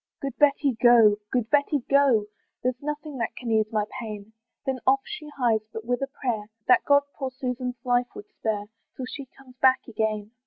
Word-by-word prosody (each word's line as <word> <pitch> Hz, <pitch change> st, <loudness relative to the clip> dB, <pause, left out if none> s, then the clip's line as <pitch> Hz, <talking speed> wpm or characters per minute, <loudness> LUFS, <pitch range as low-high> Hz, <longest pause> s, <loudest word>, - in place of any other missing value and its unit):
"Good 275 Hz, -2 st, -4 dB
Betty 285 Hz, -1 st, +4 dB
go, 230 Hz, -4 st, +7 dB
good 245 Hz, -4 st, 0 dB
Betty 290 Hz, -1 st, +2 dB
go, 275 Hz, -6 st, +4 dB, 0.4 s
"There's 255 Hz, 0 st, -1 dB
nothing 295 Hz, -1 st, -5 dB
that 230 Hz, -, -2 dB
can 240 Hz, -3 st, -4 dB
ease 220 Hz, -1 st, +2 dB
my 210 Hz, -2 st, +1 dB
pain." 215 Hz, -2 st, -7 dB, 0.3 s
Then 265 Hz, -2 st, -1 dB
off 270 Hz, +1 st, +5 dB
she 310 Hz, -8 st, -7 dB
hies, 235 Hz, -4 st, +3 dB
but 220 Hz, 0 st, -7 dB
with 245 Hz, +1 st, -1 dB
a 275 Hz, -, -1 dB
prayer 240 Hz, -6 st, -3 dB, 0.2 s
That 250 Hz, -, +5 dB
God 285 Hz, 0 st, +5 dB
poor 270 Hz, -2 st, -4 dB
Susan's 250 Hz, -1 st, -4 dB
life 245 Hz, -1 st, +2 dB
would -, -, -8 dB
spare, 210 Hz, -2 st, -3 dB, 0.3 s
Till 260 Hz, -, -5 dB
she 270 Hz, +1 st, -8 dB
comes 255 Hz, -1 st, -19 dB
back 260 Hz, 0 st, +4 dB
again. 215 Hz, -2 st, -2 dB
250 Hz, 190 wpm, -26 LUFS, 220-275 Hz, 0.4 s, go